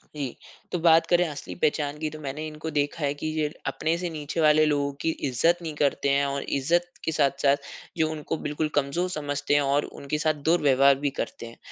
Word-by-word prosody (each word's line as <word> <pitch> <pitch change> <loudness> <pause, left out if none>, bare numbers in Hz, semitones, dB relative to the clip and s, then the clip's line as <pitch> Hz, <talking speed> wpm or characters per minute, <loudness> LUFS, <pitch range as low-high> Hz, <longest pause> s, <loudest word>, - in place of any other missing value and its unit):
जी, 140 -5 -4 0.4
तो 180 - -1
बात 165 0 +5
करें 175 0 +4
असली 150 -2 -7
पहचान 150 -3 0
की 155 0 -2
तो 155 +1 -9
मैंने 150 +1 -5
इनको 155 +1 -6
देखा 145 +2 -1
है 140 0 +1
कि 145 +2 -5
ये 150 -1 +1 0.2
अपने 160 +2 0
से 175 0 -3
नीचे 155 0 -5
वाले 155 0 +5
लोगों 145 -2 +1
की - - +1 0.2
इज़्ज़त 150 +7 +2
नहीं 160 -2 -5
करते 140 -1 +1
हैं 140 +1 +3
और 140 0 -2
इज़्ज़त 175 +6 +1
के 160 - 0
साथ-साथ 140 -2 +2 0.4
जो 155 -1 +2
उनको 155 0 -4
बिल्कुल 150 +1 -2
कमज़ोर 145 +6 0
समझते 145 -3 -2
हैं 145 - +5
और 140 +1 +1
उनके 140 +2 -4
साथ 155 +1 +2 0.2
दुर्व्यवहार 140 -4 +5
भी - - +4
करते - - -6
हैं। 115 0 -11
150 Hz, 210 wpm, -26 LUFS, 140-160 Hz, 0.4 s, बात